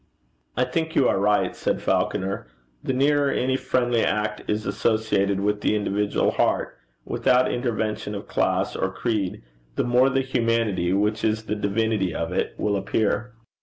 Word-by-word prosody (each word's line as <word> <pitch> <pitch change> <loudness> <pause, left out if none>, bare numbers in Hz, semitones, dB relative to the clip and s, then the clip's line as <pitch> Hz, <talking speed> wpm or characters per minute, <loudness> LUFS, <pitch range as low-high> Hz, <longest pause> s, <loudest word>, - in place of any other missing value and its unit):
'I 125 - +3
think 160 +6 -2
you 135 - +4
are - - +2
right,' 105 +1 +2
said - - -1
Falconer. 95 -8 -1 0.4
'The 130 - -1
nearer 140 +2 +3
any 130 0 0
friendly 125 -3 +1
act 105 0 -1
is 105 0 -1
associated 100 -1 +1
with 105 +1 0
the - - +2
individual 105 0 0
heart, - - 0 0.3
without 125 0 +2
intervention 110 -4 -2
of 100 - -7
class - - 0
or 95 - -1
creed, 100 - -2 0.3
the - - +1
more 125 +2 +4
the 135 0 +1
humanity, 115 -8 0
which 105 +3 +1
is 110 0 +1
the 105 - -2
divinity 105 -3 0
of 85 +1 -2
it, 90 - -1
will 105 -1 0
appear.' 110 +4 -1
110 Hz, 160 wpm, -24 LUFS, 100-125 Hz, 0.4 s, you